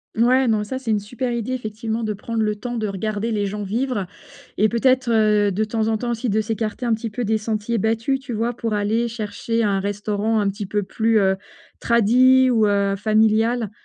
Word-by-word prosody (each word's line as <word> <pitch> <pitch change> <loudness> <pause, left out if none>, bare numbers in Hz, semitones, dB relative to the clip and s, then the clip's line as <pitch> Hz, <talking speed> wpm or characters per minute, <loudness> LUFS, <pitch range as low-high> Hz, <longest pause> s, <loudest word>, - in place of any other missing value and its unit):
Mouais, 250 +3 +3
non, 215 -2 +2
ça, 235 +5 -4
c'est 260 -4 -3
une 210 - +2
super 245 +4 -4
idée, 235 +1 -2
effectivement, 225 -1 -4
de 215 -1 -1
prendre 220 +2 -3
le 210 0 0
temps 240 +3 -5
de 215 -2 -1
regarder 215 +3 -3
les 205 -2 0
gens 210 +1 -4
vivre 225 +1 -2 0.5
et 215 +1 +3
peut-être, 255 +1 +2
heu, 210 -2 +3
de 205 +3 0
temps 220 0 -1
en 220 -1 +1
temps 240 +1 -3
aussi, 235 +1 -2
de 215 +1 +1
s'écarter 220 +2 -3
un 235 - +2
petit 225 +1 -3
peu 235 +4 -3
des 220 +1 +1
sentiers 215 +1 -2
battus, 225 +6 0
tu 260 -2 -9
vois? 230 +3 -1
Pour 225 -2 -3
aller 220 +3 0
chercher 230 0 -3
un 200 -2 +1
restaurant 205 +2 -1
un 205 - +1
petit 200 0 -5
peu 205 +1 -1
plus, 225 +3 +1
heu, 190 -2 +3 0.4
tradi 255 +3 +4
ou, 220 -3 +3
heu, 200 -1 +1
familial. 220 +2 +2
220 Hz, 210 wpm, -21 LUFS, 210-235 Hz, 0.5 s, tradi